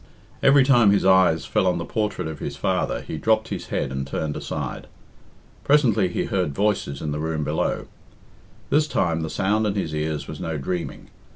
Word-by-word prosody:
Every 135 0 +6
time 120 -6 +5
his 100 -1 +3
eyes 95 -6 +4
fell 70 +7 +1
on 90 -1 +2
the 85 - -4
portrait 105 -3 -2
of 80 -2 -6
his - - -5
father - - -1
he 80 - -6
dropped 110 0 +1
his 100 -4 -5
head - - -2
and 65 0 -3
turned 75 +2 -3
aside. - - -5 0.8
Presently 125 -9 +3
he 90 - -2
heard 90 -7 -1
voices 100 -9 -1
in 75 - -2
the 75 - -3
room 80 -1 -2
below. 75 +2 -1 0.9
This 150 +1 +3
time 85 - 0
the 80 - -3
sound 105 +5 +1
in 100 - -1
his 85 -6 -2
ears 75 0 -2
was 75 -1 -7
no 80 -1 -3
dreaming. 85 +5 -4
90 Hz, 190 wpm, -23 LUFS, 75-105 Hz, 0.9 s, Every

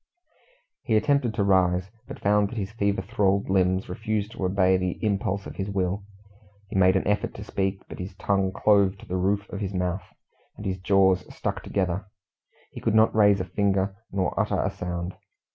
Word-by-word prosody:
He 110 -3 +2
attempted 135 -3 +1
to 100 - +1
rise, 95 -1 +2 0.2
but - - -8
found 105 0 +2
that 120 - -8
his 100 -1 -3
fever 100 -3 0
thralled 100 -2 +1
limbs 95 0 +2
refused 105 +2 -2
to 100 - -6
obey 95 0 +3
the 90 -1 -1
impulse 100 -1 -1
of - - -9
his 100 +1 -3
will. 95 0 -1 0.7
He - - -7
made 95 0 +5
an 95 - 0
effort 105 0 0
to 100 - -7
speak, 95 -2 -2
but - - -9
his 90 +1 -6
tongue 95 -1 0
clove 100 -1 +3
to - - -13
the 90 - -4
roof 100 +2 0
of 100 - -4
his 100 -2 -3
mouth, 90 +1 -1 0.6
and 105 - -8
his 95 -1 -2
jaws 95 -1 +3
stuck - - -3
together. 95 0 -2 0.6
He - - -9
could - - +1
not 110 0 +5
raise 105 -2 +5
a 90 - -2
finger 95 +1 0 0.2
nor 95 -1 0
utter - - +1
a - - 0
sound. 90 0 -4
95 Hz, 195 wpm, -26 LUFS, 95-100 Hz, 0.7 s, made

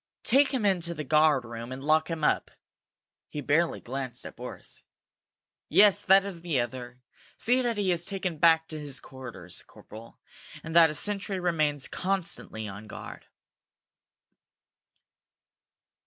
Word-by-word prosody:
Take 275 +3 +4
him 255 -6 -1
into 170 -3 +1
the 150 - -4
guard 150 -2 +3
room 115 +1 -7
and 130 +1 -6
lock 155 +2 +3
him 165 -2 -4
up." - - +2 0.8
He 150 - -5
barely 155 +4 +1
glanced 130 -1 -6
at - - -8
Boris. - - -8 0.9
"Yes, 200 +4 +6
that 195 +1 +5
is 185 -4 -6
the 165 -6 0
other. 125 +1 -5 0.3
See 245 +3 +2
that 240 -3 0
he 195 -3 +1
is 175 -1 -2
taken 185 -5 -3
back 160 0 +5
to 155 - -5
his 145 -3 -5
quarters, 120 -10 -8
corporal, 110 +2 -14 0.4
and 160 +1 -6
that 165 -1 +8
a 150 - -4
sentry 200 +3 -1
remains 155 -6 0
constantly 180 - -3
on 100 +2 -9
guard." - - -9
155 Hz, 140 wpm, -28 LUFS, 130-185 Hz, 0.9 s, that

